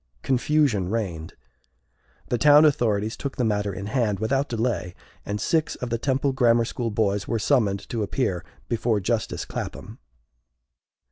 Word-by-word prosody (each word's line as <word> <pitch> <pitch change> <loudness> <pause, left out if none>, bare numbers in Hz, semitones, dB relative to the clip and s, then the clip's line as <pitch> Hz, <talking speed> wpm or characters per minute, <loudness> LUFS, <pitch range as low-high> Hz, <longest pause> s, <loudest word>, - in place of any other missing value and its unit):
Confusion 130 -7 +1
reigned. 95 -8 -3 0.9
The 120 - 0
town 150 +1 +7
authorities 110 -7 +1
took 140 -2 -5
the 125 - +1
matter 105 -2 0
in 100 +1 -6
hand 105 -3 0
without 135 +6 0
delay, 115 -6 -2 0.3
and 105 +1 -2
six 160 +4 0
of 125 -2 -6
the 115 - 0
Temple 135 +2 +1
Grammar 120 -3 +3
School 115 0 -3
boys 105 -2 0
were 115 - 0
summoned 105 -5 +1
to 115 - -2
appear 105 -4 -1 0.2
before 115 -2 0
justice 110 +2 -2
Clapbam. - - -7
115 Hz, 145 wpm, -24 LUFS, 105-130 Hz, 0.9 s, town